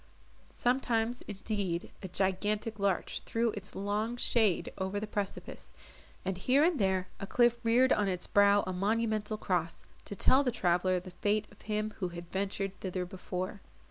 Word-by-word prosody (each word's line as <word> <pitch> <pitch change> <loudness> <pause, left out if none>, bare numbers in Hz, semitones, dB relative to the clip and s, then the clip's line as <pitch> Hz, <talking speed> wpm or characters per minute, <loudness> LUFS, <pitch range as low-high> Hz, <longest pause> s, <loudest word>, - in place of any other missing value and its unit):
Sometimes, 245 -1 +1
indeed, 195 -4 -3
a 190 - -5
gigantic 205 +4 -1
larch 195 -2 0
threw 230 0 0
its 205 -1 -7
long 210 +4 -1
shade 215 -8 +2
over 190 +2 -1
the 215 - -3
precipice, 205 -2 -5 0.5
and 190 -1 -2
here 265 +8 +4
and 335 -3 +3
there 190 -2 +1
a 195 - -5
cliff 240 +1 +3
reared 245 +3 +5
on 210 -1 +1
its 180 -2 -1
brow 200 0 +5
a 185 - -3
monumental 215 +2 0
cross, 175 -5 -1 0.2
to 200 - -6
tell 260 +8 +5
the 260 - +1
traveller 185 -4 +2
the 180 +1 -10
fate 205 +4 0
of 205 - -18
him 215 0 -2
who 185 - 0
had 175 0 -9
ventured 195 0 -2
thither 185 -1 -3
before. 185 +2 -5
205 Hz, 165 wpm, -31 LUFS, 185-220 Hz, 0.5 s, reared